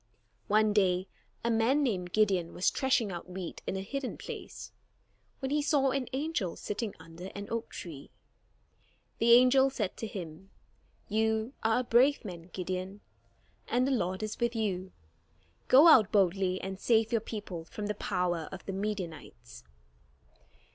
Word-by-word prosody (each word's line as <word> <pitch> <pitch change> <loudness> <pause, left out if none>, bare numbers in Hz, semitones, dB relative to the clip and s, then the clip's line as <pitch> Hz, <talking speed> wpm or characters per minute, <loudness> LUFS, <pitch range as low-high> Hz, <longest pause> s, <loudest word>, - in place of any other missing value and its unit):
One 215 0 +3
day, 185 -2 +2 0.4
a 235 - +1
man 235 +6 +3
named 185 -9 -1
Gideon 190 -5 +1
was 180 - +2
threshing 250 -6 +1
out 175 0 -7
wheat 180 -1 -6
in - - -1
a - - -3
hidden 275 +4 -4
place, - - -8 0.7
when 265 -1 -4
he 295 +1 +2
saw 285 -2 +2
an 270 -2 -1
angel 265 - -2
sitting 210 0 -4
under 165 +2 -11
an 200 0 -6
oak 230 0 -3
tree. 155 -6 -9 1.1
The 235 +1 +6
angel 255 +2 +6
said 215 -8 -3
to 225 - -4
him: 180 -2 -8 0.6
"You 220 +3 0
are 225 +2 +2
a - - -5
brave 255 +3 +3
man, 175 -3 -8
Gideon, 185 +2 -4 0.7
and 250 +1 +2
the 275 - 0
Lord 190 -5 -1
is 215 - -4
with 235 0 0
you. 190 -4 -2 0.8
Go 280 +6 +8
out 220 - +7
boldly, 190 -2 +2
and 190 0 -5
save 225 -1 +2
your 230 -2 +2
people 200 -7 -6
from 210 +4 -6
the 210 - -1
power 175 -5 -2
of 190 - -9
the 195 - -4
Midianites." 175 - -6
210 Hz, 155 wpm, -30 LUFS, 185-235 Hz, 1.1 s, Go